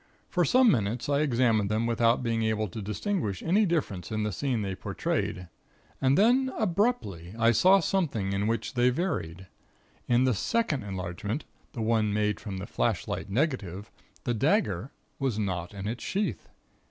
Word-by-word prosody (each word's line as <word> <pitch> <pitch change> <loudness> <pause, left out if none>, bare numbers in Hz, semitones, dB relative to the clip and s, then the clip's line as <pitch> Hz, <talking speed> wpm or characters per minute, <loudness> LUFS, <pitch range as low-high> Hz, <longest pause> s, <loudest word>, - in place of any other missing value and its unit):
For 180 - +2
some 250 - +5
minutes 115 +2 -1
I 140 0 +2
examined 120 -7 +2
them 110 +2 0
without 115 +1 +2
being 115 -1 0
able 110 -1 0
to 110 +5 -6
distinguish 105 - -2
any 200 +5 +3
difference 120 - -2
in 110 -1 -1
the 105 - -1
scene 125 0 -1
they 95 -1 -2
portrayed, 90 -1 -3 0.5
and 135 +1 +3
then 255 +5 +4
abruptly, 175 - -1
I 115 0 +4
saw 185 - +5
something 140 - 0
in 100 +2 0
which 115 +1 -1
they 125 -1 +3
varied. 95 - -2 0.6
In 120 +1 +4
the 130 -1 +3
second 170 - 0
enlargement 100 - -4 0.3
the 115 - -3
one 110 -2 +2
made 105 -1 0
from 100 -3 -6
the 95 - -5
flashlight 100 - -2
negative 105 - -2 0.3
the 120 - 0
dagger 130 - +1 0.3
was 130 -6 0
not 90 -5 -2
in 100 0 -6
its 115 +3 -4
sheath. 200 +2 -2
115 Hz, 165 wpm, -28 LUFS, 100-150 Hz, 0.6 s, some